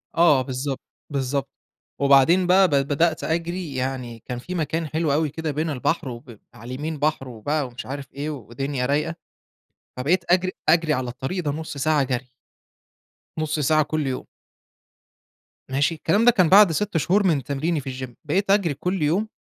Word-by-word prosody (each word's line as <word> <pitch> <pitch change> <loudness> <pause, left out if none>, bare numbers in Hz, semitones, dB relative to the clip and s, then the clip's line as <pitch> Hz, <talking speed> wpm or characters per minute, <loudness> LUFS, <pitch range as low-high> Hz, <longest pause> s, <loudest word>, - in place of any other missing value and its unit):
آه 165 -6 +5
بالضبط، 130 +1 -3 0.3
بالضبط. 140 -1 -2 0.5
وبعدين 140 +6 +5
بقى 190 +1 +6
ب - - -7
بدأت 145 +4 +1
أجرِي، 170 -1 -2
يعني 125 -3 -3
كان 125 -1 -4
في 180 +9 -6
مكان 160 0 -1
حلو 155 0 0
أوي 155 +1 +1
كده 160 +2 -3
بين 155 +3 -2
البحر 145 +1 -1
وب 120 -2 -10
على 115 - -12
اليمين 155 +2 -4
بحر 150 -2 0
و 115 -3 -11
بقى 145 +2 0
ومش 125 0 -9
عارف 140 0 -7
إيه 145 +2 -4
ودنيا 135 0 -4
رايقة، 150 +5 0 0.8
فبقيت 165 +8 +1
أجرِي 185 +1 +3 0.2
أجرِي 165 -1 +4
على 125 -3 -2
الطريق 135 +9 -4
ده 145 - 0
نُص 155 0 -6
ساعة 150 +1 +2
جري. 130 -1 -3 1.1
نُص 155 0 -1
ساعة 155 +2 +3
كلّ 155 -1 -2
يوم. 130 - -3 1.4
ماشي، 140 +5 +1
الكلام 200 +8 +1
ده 245 - +8
كان 185 -7 +3
بعد 195 -1 +8
6 195 +3 -1
شهور 190 +5 +2
من 150 -6 +1
تمريني 150 +5 -1
في 135 - -6 0.2
الgym - - -16
بقيت 195 +7 +1
أجرِي 195 -6 +3
كلّ 180 +5 -2
يوم. 175 +9 +1
150 Hz, 175 wpm, -23 LUFS, 135-165 Hz, 1.4 s, ده